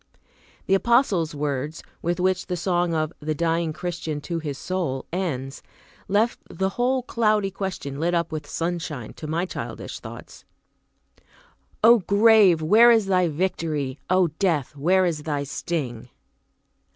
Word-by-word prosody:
The 195 - +1
Apostle's 195 - +2
words, 145 +1 -3 0.2
with 175 +2 -1
which 185 0 0
the 180 - -2
song 175 -1 0
of 155 +1 -1
"The 155 0 -2
Dying 165 +1 0
Christian 160 -2 -4
to 170 +2 -3
his 145 -4 -5
Soul" 170 -8 -3
ends, 140 -8 -3 0.5
left 210 +4 +1
the 190 0 -1
whole 250 +5 0
cloudy 215 -5 +1
question 185 -8 -5
lit 175 +2 +1
up 170 -1 0
with 155 -2 -5
sunshine, 165 -8 -4
to 155 - -8
my 165 +4 -1
childish - - -6
thoughts: - - -11 1.4
"O 235 +1 +8
grave, 200 -3 +5
where 220 +9 +7
is 225 -3 +5
thy 185 -2 +2
'victory? 155 -5 -2
O 185 -1 +3
death, 160 -9 0
where 185 +6 +3
is 165 -4 -1
thy 145 -2 -2
sting?" 140 -4 -4
170 Hz, 140 wpm, -24 LUFS, 150-190 Hz, 1.4 s, O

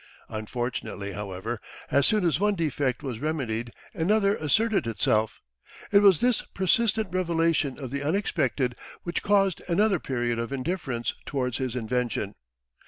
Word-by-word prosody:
Unfortunately, 110 -2 -4
however, 105 +3 -4 0.3
as 140 -1 +4
soon 210 -4 +2
as 160 -3 +2
one 205 0 +2
defect 145 -5 -1
was 125 -5 -4
remedied 120 -7 -2 0.2
another 200 +3 +2
asserted 195 - +2
itself. 110 0 +1 0.5
It 200 - +7
was 195 -5 +6
this 245 -2 +3
persistent 215 +2 +1
revelation 165 -6 +1
of 130 -4 -6
the 140 0 -2
unexpected 145 -6 0 0.3
which 170 - -2
caused 195 -3 +2
another 195 +1 +3
period 120 -4 -1
of 115 +2 -3
indifference 135 -4 -2
towards 125 -3 -1
his 130 -2 -2
invention. 120 -3 -1
140 Hz, 135 wpm, -27 LUFS, 120-190 Hz, 0.5 s, It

